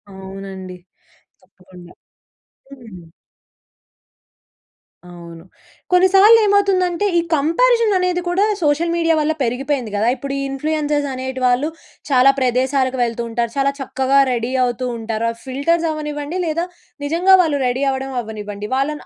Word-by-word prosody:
అవునండి. 190 Hz, -1 st, -9 dB, 0.6 s
తప్పకుండా 180 Hz, -2 st, -17 dB, 0.8 s
హ్మ్. 205 Hz, -10 st, -13 dB, 2.0 s
అవును. 170 Hz, -1 st, -12 dB, 0.5 s
కొన్నిసార్లేమవుతుందంటే 390 Hz, -1 st, +4 dB
ఈ -, -, +5 dB
కంపారిజననేది 365 Hz, -, +2 dB
కూడా 365 Hz, +4 st, +2 dB, 0.2 s
సోషల్ 315 Hz, +3 st, +1 dB
మీడియా 330 Hz, -1 st, +2 dB
వల్ల 305 Hz, +1 st, +1 dB
పెరిగిపోయింది 250 Hz, -1 st, -2 dB
గదా! 210 Hz, +3 st, 0 dB
ఇప్పుడు 275 Hz, +2 st, -6 dB
ఈ -, -, -2 dB
ఇన్‌ఫ్లుయెన్సర్స్ 295 Hz, +1 st, -1 dB
అనేటి 260 Hz, 0 st, -5 dB
వాళ్ళు 250 Hz, +4 st, +2 dB, 0.4 s
చాలా 265 Hz, -1 st, +5 dB
ప్రదేశాలకు 260 Hz, +1 st, 0 dB
వెళ్తుంటారు, 235 Hz, 0 st, -2 dB
చాలా 275 Hz, 0 st, +2 dB
చక్కగా 270 Hz, 0 st, +1 dB
రెడీ 235 Hz, 0 st, -2 dB
అవుతుంటారు. 235 Hz, -2 st, -2 dB
ఆ 230 Hz, -, -12 dB
ఫిల్టర్స్ 285 Hz, +6 st, 0 dB
అవ్వనివ్వండి, 300 Hz, +2 st, -4 dB
లేదా 335 Hz, +2 st, -1 dB, 0.4 s
నిజంగా 355 Hz, +5 st, +4 dB
వాళ్ళు 295 Hz, -3 st, -1 dB
రెడీ 255 Hz, +3 st, -1 dB
అవ్వడం 265 Hz, 0 st, -4 dB
అవ్వనివ్వండి. 210 Hz, -2 st, -7 dB
వాళ్ళను 295 Hz, +3 st, -2 dB
270 Hz, 110 wpm, -19 LUFS, 230-330 Hz, 2.0 s, ఈ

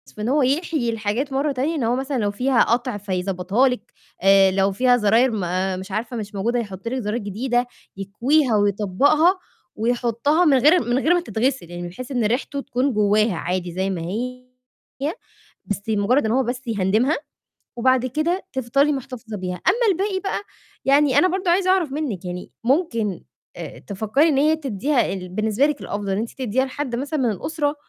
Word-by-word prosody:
في 210 Hz, -, -7 dB
إن 220 Hz, -, -1 dB
هو 290 Hz, +3 st, +3 dB
يحيي 280 Hz, -2 st, 0 dB
الحاجات 225 Hz, +5 st, -2 dB
مرّه 280 Hz, +2 st, +1 dB
تانية، 280 Hz, +5 st, -1 dB
إن 285 Hz, -, -1 dB
هو 235 Hz, +2 st, +1 dB
مثلًا 270 Hz, 0 st, -2 dB
لو 205 Hz, -3 st, 0 dB
فيها 250 Hz, +3 st, +2 dB
قَطْع 240 Hz, -1 st, 0 dB
فيضبطها 195 Hz, +4 st, 0 dB
لكِ، 250 Hz, -, -6 dB, 0.3 s
آآ، 195 Hz, 0 st, +6 dB
لو 195 Hz, +1 st, +2 dB
فيها 250 Hz, +4 st, +3 dB
زراير 230 Hz, +3 st, +3 dB
ما 185 Hz, -1 st, -1 dB
مش 190 Hz, +2 st, -8 dB
عارفة 225 Hz, +4 st, -3 dB
مش 205 Hz, -1 st, -6 dB
موجودة 235 Hz, +5 st, 0 dB
يحُطّ 200 Hz, -2 st, -6 dB
لكِ 260 Hz, +1 st, -2 dB
زراير 210 Hz, +3 st, -1 dB
جديدة، 240 Hz, +5 st, -1 dB, 0.3 s
يكويها 235 Hz, +7 st, +1 dB
ويطبَّقها 215 Hz, -, +3 dB, 0.4 s
ويحُطّها 240 Hz, +8 st, +1 dB
من 280 Hz, -3 st, +5 dB
غير 300 Hz, +7 st, +5 dB
من 240 Hz, +3 st, +1 dB
غير 325 Hz, +5 st, +3 dB
ما 350 Hz, -, +2 dB
تتغسِل 245 Hz, -, -2 dB
يعني، 175 Hz, 0 st, -5 dB
بحيث 255 Hz, +9 st, -9 dB
إن 245 Hz, -4 st, 0 dB
ريحتُه 265 Hz, +5 st, -1 dB
تكون 270 Hz, 0 st, -1 dB
جواها 210 Hz, -1 st, +2 dB
عادي 180 Hz, +1 st, -3 dB
زي 190 Hz, +2 st, -1 dB
ما 185 Hz, -3 st, -3 dB
هي، 250 Hz, +8 st, -5 dB, 1.2 s
بس 205 Hz, -1 st, -3 dB
مجرّد 220 Hz, +4 st, +2 dB
إن 220 Hz, -, 0 dB
هو 265 Hz, +2 st, +3 dB
بس 245 Hz, +2 st, -3 dB
يهندِمها، 220 Hz, +7 st, +1 dB, 0.6 s
وبعد 255 Hz, +1 st, +2 dB
كده 320 Hz, +9 st, -1 dB
تفضلي 270 Hz, +3 st, +1 dB
محتفظة 255 Hz, -5 st, -6 dB
بيها، 180 Hz, -1 st, -4 dB
أمّا 475 Hz, 0 st, +3 dB
الباقي 380 Hz, +1 st, -1 dB
بقى، 390 Hz, +1 st, -2 dB, 0.5 s
يعني 280 Hz, 0 st, +4 dB
أنا 365 Hz, -, +5 dB
برضه 370 Hz, 0 st, -1 dB
عايزة 370 Hz, +1 st, +3 dB
أعرف 355 Hz, -7 st, +2 dB
منِّك 275 Hz, -, -3 dB
يعني 180 Hz, 0 st, -6 dB
ممكن 230 Hz, -, 0 dB, 0.3 s
آآ، -, -, -8 dB
تفكّري 220 Hz, -, +1 dB
إن 285 Hz, -4 st, +2 dB
هي 305 Hz, +3 st, +3 dB
تدّيها 270 Hz, -3 st, 0 dB
ال 180 Hz, -1 st, -6 dB
بالنسبة 215 Hz, +7 st, +1 dB
لِك 295 Hz, -1 st, -2 dB
الأفضل 205 Hz, -1 st, -4 dB
إن 195 Hz, -, 0 dB
أنتِ 225 Hz, +2 st, -3 dB
تديها 260 Hz, 0 st, 0 dB
لحد 265 Hz, -2 st, -4 dB
مثلًا 285 Hz, +3 st, -2 dB
من 240 Hz, -, +2 dB
الأُسرة، 290 Hz, -, -2 dB
245 Hz, 185 wpm, -22 LUFS, 205-280 Hz, 1.2 s, آآ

